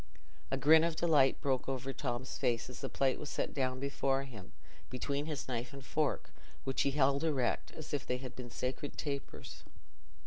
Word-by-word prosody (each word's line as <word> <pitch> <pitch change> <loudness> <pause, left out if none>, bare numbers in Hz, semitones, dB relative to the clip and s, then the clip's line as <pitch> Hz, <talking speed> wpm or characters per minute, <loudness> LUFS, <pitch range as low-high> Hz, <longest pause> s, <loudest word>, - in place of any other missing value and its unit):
A 135 - +1
grin 155 +4 +7
of 165 -1 +1
delight 150 -6 +4
broke 135 -1 +1
over 135 0 -2
Tom's 130 -1 -3
face 120 +1 0
as 125 - -9
the 135 - -3
plate 135 -1 +2
was 150 - -5
set - - -1
down 130 -2 0
before 135 0 +1
him, 110 -9 -10 0.4
between 140 +3 -2
his 150 -4 -3
knife 125 +1 -3
and 140 -1 -9
fork, 150 0 0 0.3
which 135 - 0
he 140 - +3
held 140 0 +3
erect, 145 -6 +1
as 155 -1 -8
if 140 -3 -1
they 125 - +1
had 130 -1 -7
been 125 -1 -7
sacred 130 +4 -3
tapers. 140 -2 -5
135 Hz, 185 wpm, -34 LUFS, 130-145 Hz, 0.4 s, grin